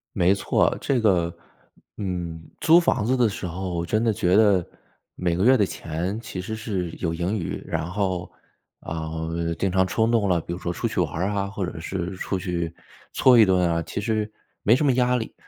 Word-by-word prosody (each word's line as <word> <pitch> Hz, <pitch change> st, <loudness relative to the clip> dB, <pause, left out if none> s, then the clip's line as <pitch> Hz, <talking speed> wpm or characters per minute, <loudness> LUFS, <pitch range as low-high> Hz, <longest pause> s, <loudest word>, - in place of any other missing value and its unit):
没 90 Hz, +2 st, +4 dB
错， 100 Hz, -, +1 dB
这 130 Hz, -4 st, 0 dB
个， 85 Hz, -5 st, +2 dB, 0.6 s
嗯， 90 Hz, -5 st, -4 dB, 0.2 s
租 165 Hz, +1 st, +7 dB
房 135 Hz, -9 st, +1 dB
子 130 Hz, +4 st, +1 dB
的 120 Hz, -2 st, +4 dB
时 100 Hz, -3 st, -4 dB
候， 90 Hz, 0 st, -3 dB
真 110 Hz, +6 st, 0 dB
的 115 Hz, -2 st, +2 dB
觉 95 Hz, -4 st, +2 dB
得 100 Hz, -4 st, +5 dB, 0.5 s
每 85 Hz, -2 st, 0 dB
个 90 Hz, -, 0 dB
月 130 Hz, +2 st, +6 dB
的 105 Hz, -, +3 dB
钱 90 Hz, +4 st, -4 dB
其 110 Hz, -5 st, -7 dB
实 105 Hz, +4 st, -4 dB
是 100 Hz, -6 st, -3 dB
有 85 Hz, -, -1 dB
盈 90 Hz, +5 st, -1 dB
余， 90 Hz, -6 st, -3 dB
然 80 Hz, -1 st, -2 dB
后， 90 Hz, -2 st, -2 dB, 0.5 s
啊， 80 Hz, -1 st, -5 dB, 0.5 s
经 95 Hz, +1 st, 0 dB
常 95 Hz, 0 st, +3 dB
冲 110 Hz, +5 st, +1 dB
动 110 Hz, -4 st, +2 dB
了， 90 Hz, -2 st, +3 dB
比 85 Hz, -, -6 dB
如 85 Hz, -, -6 dB
说 85 Hz, -, -3 dB
出 85 Hz, -, -2 dB
去 -, -, -3 dB
玩 -, -, 0 dB
儿 90 Hz, +4 st, 0 dB
啊， 100 Hz, -1 st, -1 dB
或 100 Hz, -1 st, -3 dB
者 85 Hz, -2 st, -6 dB
是 90 Hz, +2 st, -4 dB
出 95 Hz, +1 st, -2 dB
去 85 Hz, -2 st, -3 dB, 0.4 s
搓 125 Hz, -2 st, +5 dB
一 110 Hz, -, +9 dB
顿 90 Hz, -2 st, +3 dB
啊， 85 Hz, 0 st, 0 dB
其 80 Hz, +5 st, -5 dB
实 110 Hz, 0 st, -1 dB, 0.3 s
没 110 Hz, -, +5 dB
什 150 Hz, -, +1 dB
么 140 Hz, -, +5 dB
压 125 Hz, 0 st, +2 dB
力。 115 Hz, -2 st, -3 dB
95 Hz, 225 characters per minute, -24 LUFS, 85-110 Hz, 0.6 s, 一